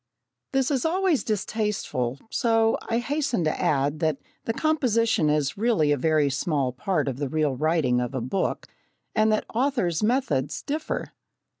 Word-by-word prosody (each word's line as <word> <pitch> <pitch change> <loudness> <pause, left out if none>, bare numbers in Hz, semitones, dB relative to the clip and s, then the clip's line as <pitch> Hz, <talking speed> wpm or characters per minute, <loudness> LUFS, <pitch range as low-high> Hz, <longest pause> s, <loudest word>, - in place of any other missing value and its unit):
This 270 0 +1
is 265 -4 +1
always 355 -2 +1
distasteful, 205 - -2
so 225 -2 +2
I 230 - +1
hasten 275 - -1
to 155 - -1
add 145 +1 +1
that 155 -4 +1 0.3
the - - 0
composition 230 - +2
is 150 +3 0
really 215 -10 +2
a - - +4
very 155 +1 +2
small 140 -2 0
part 150 +2 -1
of 130 -2 -2
the 140 -1 -2
real 150 -2 0
writing 150 -4 +1
of 125 +2 -3
a - - 0
book, 130 +11 -2 0.5
and 215 0 +3
that 215 - +1
authors' 235 - +1
methods 210 - 0
differ. 305 +2 -3
180 Hz, 155 wpm, -25 LUFS, 145-235 Hz, 0.5 s, a